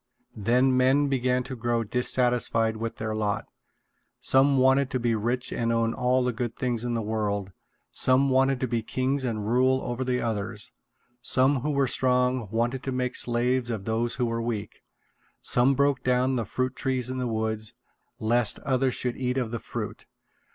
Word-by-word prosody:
Then 125 +5 +2
men 135 +3 +3
began 125 -1 +1
to 130 - -6
grow 120 -1 -1
dissatisfied 120 -1 +2
with 115 +1 -4
their 110 0 -4
lot. 105 -1 -1 0.7
Some 135 +1 +4
wanted 130 +1 +3
to 130 - -2
be 120 -1 +1
rich 120 +4 -1
and 115 0 -1
own 115 0 +1
all 125 +1 +1
the 125 -1 0
good 115 0 -4
things 120 -2 -2
in 120 -1 -2
the 115 - -2
world. 105 -2 -2 0.4
Some 130 +1 +3
wanted 135 0 +3
to 130 - 0
be 115 -1 -1
kings 130 +4 -1
and 110 -4 -2
rule 130 +3 +3
over 120 +1 -3
the 125 -1 0
others. 105 -2 -2 0.5
Some 130 +3 +3
who 145 +5 -3
were 140 -2 +1
strong 125 -3 +2
wanted 120 +4 -1
to 135 - -4
make 125 0 -2
slaves 120 +1 +1
of 110 -4 -4
those 115 +2 -1
who 125 -2 0
were 115 0 -2
weak. 110 -3 -4 0.6
Some 125 +3 +3
broke 140 0 +2
down 125 +1 +2
the 115 -3 -1
fruit 130 +3 -2
trees 130 -2 -2
in 130 - -4
the 125 - -1
woods, 110 -1 -2 0.4
lest 115 0 +1
others 130 -1 0
should 125 -1 -2
eat 125 0 -1
of 120 -4 -1
the 115 - -3
fruit. - - -6
125 Hz, 180 wpm, -26 LUFS, 115-130 Hz, 0.7 s, Some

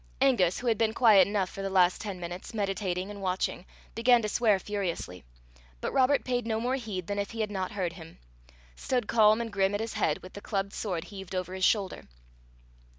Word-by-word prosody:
Angus, 235 -10 +3
who 250 - -7
had 230 -3 +1
been 220 -1 +1
quiet 210 -7 +6
enough 200 -3 -1
for 195 - -7
the 195 - -2
last 185 -2 +3
ten 200 -4 -5
minutes, 175 +5 -7
meditating 195 -2 -2
and 200 -1 -9
watching, 185 -1 -2 0.3
began 235 0 +4
to 210 - -1
swear 215 -2 +3
furiously, 185 - -4 0.6
but - - -3
Robert 270 +1 +3
paid 245 -2 -1
no 220 -1 0
more 245 +3 -1
heed 215 -9 -4
than 205 +3 -3
if 200 - -2
he 225 -1 -4
had 210 -1 -2
not 190 -2 -3
heard 180 -4 -2
him 165 -1 -12 0.6
stood 245 - -1
calm 215 -1 +5
and 225 -3 -5
grim 195 0 +2
at - - -1
his 225 0 -4
head, - - 0
with 185 - -11
the 205 - -8
clubbed 195 -1 -2
sword 180 -6 -3
heaved 195 -2 -8
over 185 0 -3
his 190 0 +1
shoulder. 200 -4 0
200 Hz, 215 wpm, -29 LUFS, 185-225 Hz, 0.6 s, quiet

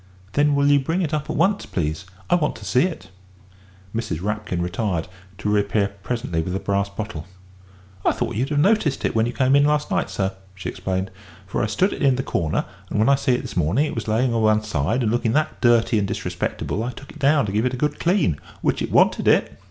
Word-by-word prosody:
"Then 145 0 +3
will 140 0 +2
you 145 0 +5
bring 165 +7 -1
it 155 -1 -2
up 150 -1 -2
at - - -2
once, 195 +5 +1
please? 80 +1 -2 0.2
I - - +1
want 160 -4 +2
to - - -10
see 125 +4 +3
it." 95 - -6 0.8
Mrs. 115 -9 -2
Rapkin 105 -1 -2
retired, 90 -1 -1 0.3
to 100 - -4
reappear 100 -1 +2
presently 105 -8 -2
with 90 +3 -4
the 95 - -1
brass 100 0 0
bottle. 100 -6 -6 0.8
"I - - +4
thought - - -2
you'd 130 +5 -1
have 150 - -1
noticed 160 -3 +2
it - - 0
when 110 0 +2
you - - -2
come 130 +2 +3
in 140 - +5
last 150 +5 +1
night, 190 -1 0
sir," 95 -1 -1 0.2
she 95 - -5
explained, 95 0 -3 0.3
"for 95 - -2
I - - +1
stood 185 - +1
it - - -7
in 135 -3 +4
the 130 - -2
corner, 85 - -1 0.2
and - - -2
when 110 +5 +3
I - - +6
see 135 -1 +1
it - - -3
this - - -7
morning 90 - +2
it - - -4
was 115 - -4
layin' 115 +3 +1
o' 115 - +1
one 110 -1 +3
side 110 - 0
and 110 - +1
looking 115 -1 +1
that 155 +2 0
dirty 120 -2 +4
and 100 - 0
disrespectable 100 - -3
I 125 +1 -3
took 135 - -12
it 155 - -13
down 145 -2 +3
to 100 - -3
give 110 +5 +1
it 125 - -3
a - - -7
good 150 +3 -1
clean, 170 - +2 0.2
which - - +1
it - - -3
wanted - - +3
it." - - +3
115 Hz, 240 wpm, -22 LUFS, 100-145 Hz, 0.8 s, I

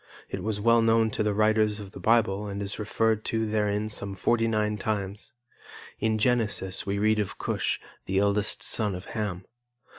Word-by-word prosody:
It 95 - -4
was 105 +1 -2
well 115 +2 +4
known 115 -1 +3
to - - -2
the 105 -1 +1
writers 110 0 +2
of 100 -2 -9
the - - -10
Bible 105 -3 +2
and 100 0 -4
is 100 +1 -4
referred 110 +1 +1
to 110 0 0
therein 105 -1 0
some 100 -2 -4
forty 115 +4 +1
nine 105 -1 0
times. 100 -1 -3 0.7
In 110 0 +1
Genesis 105 -5 0
we 100 +1 0
read 110 +1 +2
of 105 -3 -2
Cush, - - -1 0.3
the 95 - 0
eldest 100 +1 +2
son 105 -4 +1
of 90 - -8
Ham. 100 -5 -3
105 Hz, 180 wpm, -27 LUFS, 100-110 Hz, 0.7 s, well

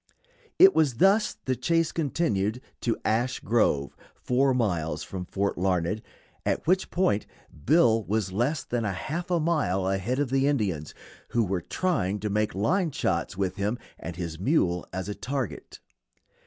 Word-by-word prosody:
It 385 +1 +8
was 145 - +2
thus 195 - +3
the 130 - +1
chase 165 +6 +1
continued 125 - 0 0.2
to 115 - 0
Ash 120 +4 +1
Grove, 75 -12 +1 0.2
four 135 +2 +2
miles 85 -11 0
from 90 +2 -6
Fort 100 -2 -1
Larned, 90 +2 0 0.4
at - - -1
which 185 +3 +2
point 105 - +1 0.4
Bill 120 -7 +5
was 105 -2 -1
less 130 +8 0
than 120 -1 -2
half 135 - -3
a 175 -1 +2
mile 150 - +1
ahead 95 +6 -1
of 140 -3 -1
the 135 +1 +3
Indians, 100 - -1 0.3
who 120 - +1
were 95 -3 -1
trying 105 - -1
to 105 -1 -2
make 105 0 0
line 170 - +1
shots 90 - -1
with 95 -2 -1
him 105 +4 -1 0.2
and 85 +1 -6
his 85 -2 -5
mule 90 - +1
as 95 +1 -4
a 105 - -3
target. 130 0 -5
110 Hz, 155 wpm, -27 LUFS, 95-145 Hz, 0.4 s, It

